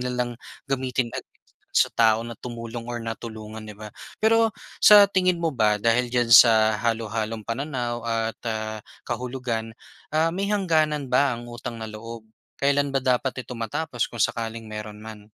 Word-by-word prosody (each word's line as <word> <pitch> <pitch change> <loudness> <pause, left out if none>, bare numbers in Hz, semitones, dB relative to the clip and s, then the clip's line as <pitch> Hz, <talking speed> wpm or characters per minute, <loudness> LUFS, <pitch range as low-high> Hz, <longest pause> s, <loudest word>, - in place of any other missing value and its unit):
nilang 125 -1 -2 0.3
gamitin 130 -4 -1
ag - - -6 0.5
sa - - +4
tao 115 -1 +3
na 115 -1 -8
tumulong 115 -1 -7
or 120 -1 -5
natulungan, 110 -1 -7
di 105 - -9
ba? 105 +1 -10 0.3
Pero 225 -1 +4 0.2
sa 205 -1 +8
tingin 185 -2 +1
mo 165 - +1
ba 110 -6 +2
dahil 115 +4 +2
diyan 120 -1 0
sa 110 -1 +7
halo-halong 110 0 -2
pananaw 120 0 -3
at, 115 -1 -1
ah, 110 -1 -3 0.2
kahulugan, 120 -3 -4 0.4
ah, 160 +1 +3
may 190 +4 -2
hangganan 155 -9 +1
ba 130 0 +3
ang 120 0 -9
utang 120 -1 -7
na 110 - -6
loob? 115 +1 -8 0.4
Kailan 140 0 +2
ba 135 - +1
dapat 130 0 0
ito 125 -1 -9
matapos 120 +2 -2
kung 120 - -2
sakaling 115 -1 -2
mayro'n 105 0 -7
man? 110 -2 -10
120 Hz, 160 wpm, -24 LUFS, 110-135 Hz, 0.5 s, sa